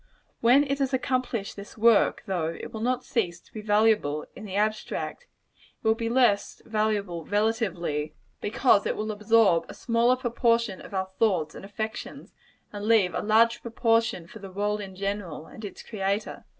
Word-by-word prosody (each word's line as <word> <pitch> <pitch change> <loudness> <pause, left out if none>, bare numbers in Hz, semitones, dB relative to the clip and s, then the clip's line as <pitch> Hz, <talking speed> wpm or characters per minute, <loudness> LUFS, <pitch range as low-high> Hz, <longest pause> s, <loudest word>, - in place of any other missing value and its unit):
When 250 +5 +5
it 275 0 -2
has 270 -1 +1
accomplished 255 -5 -2
this 200 +2 -10
work, 225 0 +4
though 180 -5 -1
it 165 - -6
will 220 - -5
not 250 +2 0
cease 175 -7 -1
to - - -26
be 215 - -6
valuable, 210 -8 +2
in 215 - -9
the 195 -2 -6
abstract, 215 - -2 0.3
it - - -9
will 220 - +6
be 230 0 -3
less 235 -5 +2
valuable 210 -6 -1
relatively 195 -8 -1 0.3
because 220 -1 +3
it - - -1
will 215 +1 -3
absorb 210 -4 +3
a - - -8
smaller 235 +1 +2
proportion 235 -4 +1
of - - -9
our 190 0 -1
thoughts 180 -9 +2
and - - -10
affections, 215 +2 -6 0.4
and 205 0 -5
leave 215 -5 +4
a - - -1
larger 230 +2 +4
proportion 230 -5 +1
for 220 - -12
the 195 -1 -9
world 205 +2 -1
in 190 -2 -8
general, 195 -5 -4
and 220 - -12
its 205 - -8
Creator. 200 -1 -3
215 Hz, 175 wpm, -27 LUFS, 195-230 Hz, 0.4 s, will